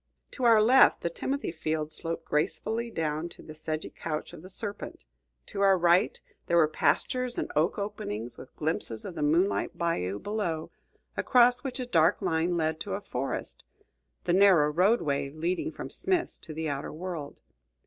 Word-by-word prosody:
To 255 - -3
our 225 -2 +7
left, 255 +4 +6
the 170 - -1
timothy 275 +8 -2
field 155 -1 -2
sloped 165 0 -4
gracefully 195 +10 -1
down 160 -4 -2
to - - -14
the 155 - -10
sedgy 155 0 -4
couch 155 +1 -5
of 170 - -10
the 185 - -11
serpent; 200 - -6 0.4
to 200 - -5
our 195 -1 +5
right, 175 +3 +3 0.3
there 170 - +3
were 160 -2 +6
pastures 250 - 0
and - - -2
oak 155 +4 +2
openings, 120 - -4
with 130 - -13
glimpses 150 -8 -1
of 185 - -5
the 160 - -5
moonlit 170 +4 +1
bayou 100 - -1
below, 175 - -3 0.4
across 245 -1 +4
which 265 -1 -4
a 255 - -2
dark 165 -9 +3
line 165 +2 0
led 160 -1 0
to 195 +3 -3
a 200 - -5
forest, 135 -8 -4 0.6
the 175 - +1
narrow 180 -6 +6
roadway 165 -6 +2
leading 170 - -2
from - - -7
Smith's 365 -3 -1
to - - -8
the 160 +1 -3
outer 140 -1 -3
world. 160 -3 -6
170 Hz, 170 wpm, -28 LUFS, 155-205 Hz, 0.6 s, our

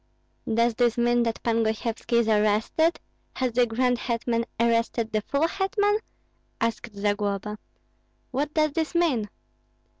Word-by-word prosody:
"Does 230 +1 +3
this 240 0 +1
mean 240 0 +3
that 230 -1 -2
Pan 230 -1 +2
Gosyevski 220 +2 -2
is 235 -1 +4
arrested? 215 +10 +2 0.4
Has 255 -1 0
the 240 +1 +3
grand 245 +2 +1
hetman 235 -1 -1
arrested 230 0 +1
the 215 - 0
full 280 +9 0
hetman?" 410 +3 +1 0.6
asked 230 -1 -2
Zagloba; 205 0 -1 0.7
"what 285 +3 -1
does 305 -1 +3
this 320 +3 -2
mean?" 270 -12 +1
235 Hz, 130 wpm, -26 LUFS, 220-260 Hz, 0.7 s, is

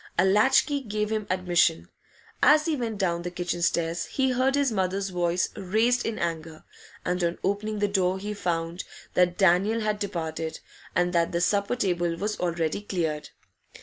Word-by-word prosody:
A 180 - +4
latch 210 +7 +4
key 285 -2 -2
gave 210 -3 -2
him 215 -1 -2
admission. 175 - +2 0.5
As 300 +3 +6
he 325 -2 +1
went 230 -5 -3
down 170 -3 0
the 175 - -4
kitchen 175 0 -3
stairs, 170 0 0
he 265 -1 0
heard 260 +2 +2
his 280 -3 +2
mother's 195 -1 -1
voice 175 0 0
raised 225 +6 +1
in 225 - -3
anger, 165 -2 -4 0.4
and 180 0 0
on 170 0 0
opening 210 +2 -1
the 205 0 +1
door 190 -2 +1
he 205 +2 -4
found 170 -3 -2 0.3
that 180 -1 +2
Daniel 195 +4 +3
had 215 -1 -1
departed, 165 -5 -4 0.4
and 180 0 +1
that 170 -1 +2
the 170 - 0
supper 200 +5 +1
table 175 -6 0
was 210 +5 -3
already 170 0 -1
cleared. 165 -7 -3
185 Hz, 175 wpm, -26 LUFS, 170-215 Hz, 0.5 s, As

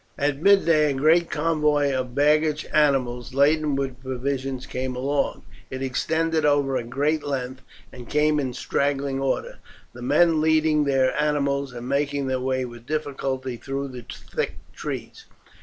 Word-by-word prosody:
At 145 -1 0
midday 165 -6 +4
a 140 - -1
great 160 +5 +3
convoy 150 -3 +1
of 130 -1 -3
baggage 150 +1 +2
animals, 130 -5 +1
laden 150 +1 +3
with 135 -2 -3
provisions, 130 0 -3
came 130 -1 -4
along. 140 +3 -1 0.3
It 130 0 -5
extended 160 +4 0
over 145 -2 +2
a - - -1
great 145 +6 -1
length, 130 -2 -4 0.3
and 125 -2 -11
came 150 0 +2
in 130 -3 -2
straggling 140 +1 -1
order, 135 -1 -2 0.3
the 120 - -11
men 155 +5 +3
leading 155 -1 +3
their 135 -2 +2
animals, 140 -2 0
and 120 0 -7
making 140 0 0
their 130 -1 -1
way 130 0 -1
with 120 0 -11
difficulty 135 -4 -3
through 135 +2 -4
the 125 -2 -9
thick - - -4 0.2
trees. - - -6
140 Hz, 150 wpm, -24 LUFS, 130-150 Hz, 0.3 s, midday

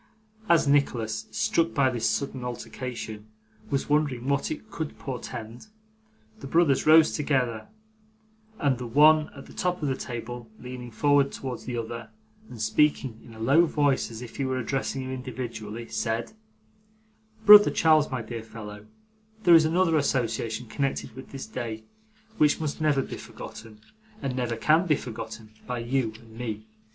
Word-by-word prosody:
As 170 -3 +5
Nicholas, 115 -6 +1
struck 210 -7 +1
by 135 -3 +3
this 115 -2 0
sudden 130 +2 -2
alteration, 120 -3 -6 0.4
was 140 -1 -1
wondering 145 -4 +1
what 140 0 +1
it 260 -9 -7
could 160 -5 -5
portend, 120 - -7 0.7
the - - -7
brothers 155 -2 +3
rose 160 0 +7
together, 130 -7 -1 0.9
and 135 -4 +1
the 125 - -5
one 150 +5 +5
at 140 - -10
the - - -14
top 180 0 -1
of - - +1
the 135 - 0
table 120 -1 -6
leaning 125 0 -8
forward 140 +4 +3
towards 130 -2 -6
the 125 -1 -3
other, 115 0 -5 0.4
and 120 - -10
speaking 115 +1 +1
in 115 - -13
a - - -12
low 140 +9 +4
voice 145 -3 +1
as 115 +1 -8
if 115 - -10
he 140 - -1
were 130 -1 -1
addressing 135 +1 -2
him 130 - -5
individually, 120 -3 -6
said: 115 - -2 1.1
'Brother 210 0 +10
Charles, 155 -2 +4
my 130 -3 -3
dear 115 +1 -6
fellow, 105 -2 -10 0.6
there 175 -3 +7
is 160 -1 +8
another 165 0 +3
association 120 -4 -1
connected 130 -1 -3
with 130 - -10
this 135 -1 -7
day 115 -3 -5 0.6
which 150 -1 +4
must 155 -1 -3
never 145 -3 +2
be - - -7
forgotten, 110 -1 -10 0.4
and 135 -9 -3
never 120 -2 -1
can 155 +10 +3
be 150 - +4
forgotten, 110 -3 -7 0.2
by 125 -1 -2
you 120 0 0
and 115 -1 -16
me. 110 -3 -5
130 Hz, 160 wpm, -27 LUFS, 115-145 Hz, 1.1 s, Brother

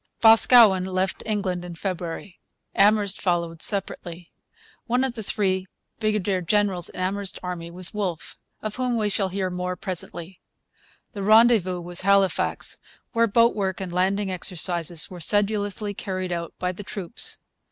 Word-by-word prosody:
Boscawen 225 -3 +7
left 185 0 -2
England 195 -5 -2
in 175 -1 -8
February. 175 0 -5 0.3
Amherst 205 -1 +3
followed 170 -3 -1
separately. 175 -3 -4 0.6
One 245 +2 +1
of 265 -2 -1
the 230 - -6
three 190 -3 -1 0.3
brigadier 210 -4 0
generals 190 -1 +1
in - - -10
Amherst's 195 +1 -2
army 175 -2 -5
was 180 +1 +2
Wolfe, 190 -6 -4 0.3
of 215 +1 -4
whom 250 -2 0
we 210 -2 0
shall 195 -1 0
hear 185 0 -2
more 180 0 -3
presently. 180 -1 -4 0.7
The 200 - -6
rendezvous 215 -4 +4
was 175 +1 0
Halifax, 195 0 +1 0.3
where 230 -1 +3
boat 230 +3 +4
work 190 -2 -2
and 185 -3 -5
landing 190 +2 0
exercises 175 -2 -1
were 180 - -8
sedulously 205 +2 +1
carried 185 -2 -4
out 170 -1 -4
by 180 0 -2
the 185 - -9
troops. 200 +2 -3
190 Hz, 145 wpm, -24 LUFS, 180-210 Hz, 0.7 s, Boscawen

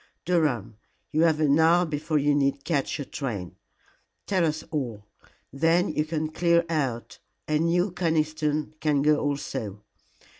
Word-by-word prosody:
Durham, 135 - 0 0.3
you 155 - +1
have 160 -2 +2
an 150 0 +3
hour 170 +2 +5
before 155 0 -1
you 145 0 +2
need 140 -1 0
catch 155 -5 -1
your 145 - -5
train. 105 -13 -5 0.7
Tell 190 -3 +1
us 155 0 -3
all. 120 -9 -3 0.5
Then 165 +6 +2
you 150 0 -1
can 155 -1 -2
clear 170 +1 +2
out, 135 -8 -2 0.3
and 155 +2 +1
you, 175 +3 +1
Conniston, 155 -3 -1
can 145 -3 +1
go 150 0 +4
also. 110 -8 -3
155 Hz, 145 wpm, -26 LUFS, 140-165 Hz, 0.7 s, hour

